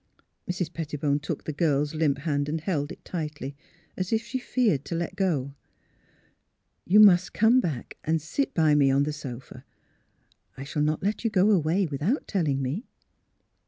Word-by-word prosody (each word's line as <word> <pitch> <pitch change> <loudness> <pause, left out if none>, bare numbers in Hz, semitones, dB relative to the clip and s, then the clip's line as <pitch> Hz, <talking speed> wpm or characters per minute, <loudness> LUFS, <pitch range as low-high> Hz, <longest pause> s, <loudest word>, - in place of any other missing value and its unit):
" - - -26
Mrs. 180 -2 -2
Pettibone 150 -3 -1
took 150 - -5
the 155 - -4
girl's 145 -1 +1
limp 155 -3 +1
hand 145 -1 -1
and 160 +2 -1
held 155 -4 -2
it - - -12
tightly, 150 -5 -5 0.4
as 185 -1 -3
if 225 0 +1
she 235 +2 -4
feared 225 - +1
to 170 - -4
let 170 +2 -3
go. 155 -9 -1 0.7
'' - - -44
You 205 +4 +6
must 185 -4 +6
come 225 +4 +5
back 155 - -4
and 160 +1 +1
sit 160 - -2
by 155 -3 +4
me 145 -2 +4
on 135 +1 +3
the 150 +1 -2
sofa. 130 -3 -9 0.9
I 135 - -6
shall 145 +2 -3
not 150 +2 0
let 205 +4 -1
you 230 - +2
go 205 0 +3
away 180 +1 +2
without 160 - -1
telling 150 -9 0
me." 145 - -3
160 Hz, 180 wpm, -26 LUFS, 145-190 Hz, 0.9 s, You